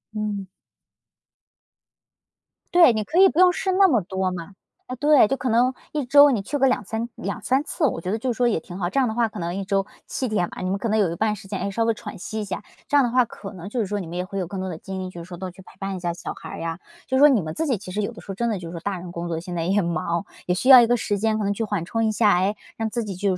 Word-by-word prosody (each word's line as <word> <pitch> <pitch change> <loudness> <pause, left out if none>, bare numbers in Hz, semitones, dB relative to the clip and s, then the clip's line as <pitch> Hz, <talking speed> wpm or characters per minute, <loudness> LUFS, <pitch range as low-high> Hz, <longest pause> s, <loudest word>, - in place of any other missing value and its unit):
嗯。 210 -2 -3 2.3
对， 345 -6 +8
你 215 -2 -1
可 320 - 0
以 385 0 +8
不 330 - -7
用 365 0 +6
试 380 - -1
那 385 0 +6
么 235 - +3
多 190 +1 -2
嘛， 180 +2 -7 0.3
啊， 255 - -5
对， 290 -3 +5
就 270 - -1
可 255 - -3
能 245 +2 +3 0.2
1 295 -4 -2
周 285 +2 +7
你 225 - 0
去 270 +9 -3
个 270 -1 +4
2，3 225 0 -1
2，3 255 +7 -1
次， 300 +1 -1
我 205 - 0
觉 180 - -4
得 220 - 0
就 245 +2 -1
是 - - -13
说 245 - +3
也 215 -8 +1
挺 175 +3 -9
好。 175 -2 -1
这 275 - 0
样 260 - +3
的 220 - -2
话 235 0 +2
可 215 - -10
能 170 +1 -3
1 195 - -3
周 195 0 0 0.2
7 260 - -2
天 205 -6 0
嘛， - - -10
你 185 - -1
们 195 - -1
可 230 - -2
能 215 - +2
有 195 -6 +2
一 170 - -3
半 215 +1 0
时 195 - -12
间， 195 -1 -4
诶， - - -2
稍 225 +4 0
微 230 0 +2
喘 215 - -9
息 215 +4 -5
一 - - -2
下， 195 0 -5 0.2
这 290 - +3
样 280 - +6
的 240 - 0
话 250 0 +4
可 205 -2 -10
能 180 +1 -8
就 245 - -3
是 220 - +1
说 205 +1 -2
你 180 - -6
们 175 +2 -6
也 180 - -2
会 195 +1 -5
有 180 - -2
更 190 +2 -5
多 190 - -3
的 165 - -5
精 190 +1 -6
力， 185 0 -5
就 170 -2 -8
是 - - -13
说 175 -1 -8
多 185 0 -5
去 190 - -15
陪 - - -18
伴 195 -1 -3
一 - - -5
下 175 -1 -2
小 - - -6
孩 - - -10
儿 - - -7
呀， 165 0 -4 0.3
就 260 - -2
是 - - +3
说 295 +1 +8
你 235 -10 +3
们 155 - -5
自 320 - -2
己 255 -5 +1
其 185 -1 -9
实 210 +3 -1
有 205 - -2
的 230 - -12
时 - - -19
候， - - -2
真 235 +5 -1
的 215 - -1
就 170 -2 -7
是 - - -8
说 170 - -5
大 195 +2 -3
人 175 0 -8
工 170 0 -5
作 165 -1 -2
现 175 +1 -7
在 170 -1 -1
也 195 +3 +2
忙， 170 +2 -1 0.2
也 180 - +2
需 220 - -2
要 255 -2 +11
一 230 - +4
个 245 - +3
时 205 -3 -1
间 220 +1 +1
可 215 - -2
能 200 0 +1
去 225 - -3
缓 205 -6 -2
冲 225 +5 -1
一 220 - +2
下， 210 -4 +3
诶， 195 +3 +1 0.2
让 225 0 -2
自 235 +1 -2
己 205 -2 -5
就 190 -1 0
205 Hz, 340 characters per minute, -23 LUFS, 185-240 Hz, 2.3 s, 要